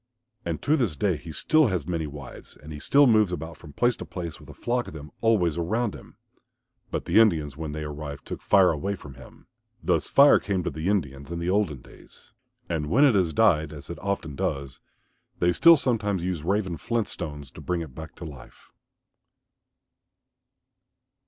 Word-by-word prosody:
And - - -4
to 150 - +3
this 115 - 0
day 90 +5 +1
he 80 +2 -9
still 155 - +3
has 90 -8 -1
many 80 -3 -2
wives 70 -2 -10
and 75 +1 -10
he 75 - -7
still 140 - +5
moves 110 -6 +4
about 80 -1 -5
from 75 0 -13
place 120 +10 +2
to - - -7
place 85 -4 -6
with - - -15
a - - -9
flock 120 +1 -1
of - - -9
them 75 -1 -9
always 90 -8 +2
around 110 +6 0
him. - - -13 0.7
But - - -3
the - - +4
Indians 80 -11 +3
when 80 0 -5
they 75 +1 -5
arrived 75 -1 -7
took - - -6
Fire 95 -3 +5
away 95 +6 -2
from 75 -7 -11
him. 65 +1 -15 0.4
Thus - - +1
Fire 140 +1 +6
came 95 -3 -2
to - - -2
the 80 +4 -3
Indians 70 -7 -2
in 85 - -3
the 85 +2 -1
olden 95 -10 0
days. - - -16 0.3
And 75 -3 -2
when 140 - +5
it 135 - +5
has 90 -5 +2
died, 80 -8 +3
as 75 +1 -9
it 85 - -7
often 95 -6 -3
does, 70 -2 -3 0.6
they 85 0 +2
still 170 - +7
sometimes 105 -9 0
use 90 -4 -2
Raven's 95 -2 -1
flint 115 -3 -1
stones 75 -5 -5
to - - -11
bring 90 -2 -2
it 75 -6 -8
back 80 +2 -9
to 85 - -9
life. 70 -5 -13
85 Hz, 195 wpm, -26 LUFS, 75-105 Hz, 0.7 s, still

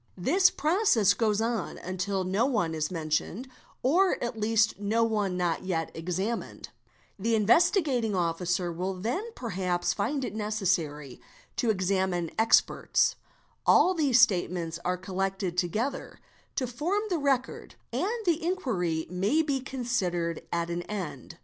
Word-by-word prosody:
This 360 - +4
Process 305 - +3
goes 215 -1 +1
on 225 -4 -2
until 185 +1 -2
no 195 +7 +1
one 210 -12 0
is 155 -1 -1
mentioned 165 - -2 0.4
or 360 +9 +3
at 240 0 -3
least 215 -1 +2
no 215 +3 +1
one 210 -5 0
not 175 -2 0
yet 165 -4 -2
eeemined, 180 +7 -4 0.5
The 225 +3 +1
Investigating 240 - +3
Officer 175 +1 0
will 185 +3 -3
then 230 - -2
perhaps 185 -6 -1
find 260 +6 -1
it - - -5
necessary 180 - -2 0.3
_ - - -44
to 235 - +1
examine 185 -4 0
experts; 225 0 +3 0.5
all 370 - +5
these 285 -8 +3
statements 175 -7 +2
are 180 +1 0
collected 190 0 -3
together 215 +10 -2 0.4
to 260 - 0
form 325 - -1
the 345 - +1
record, 270 -3 -1 0.2
and 445 +3 -1
the 340 -2 +1
inquiry 200 - -1
may 200 - +1
be 280 -3 0
considered 200 - -2
at 170 0 -1
an 170 0 -2
end. 195 -6 -6
205 Hz, 135 wpm, -28 LUFS, 180-250 Hz, 0.5 s, all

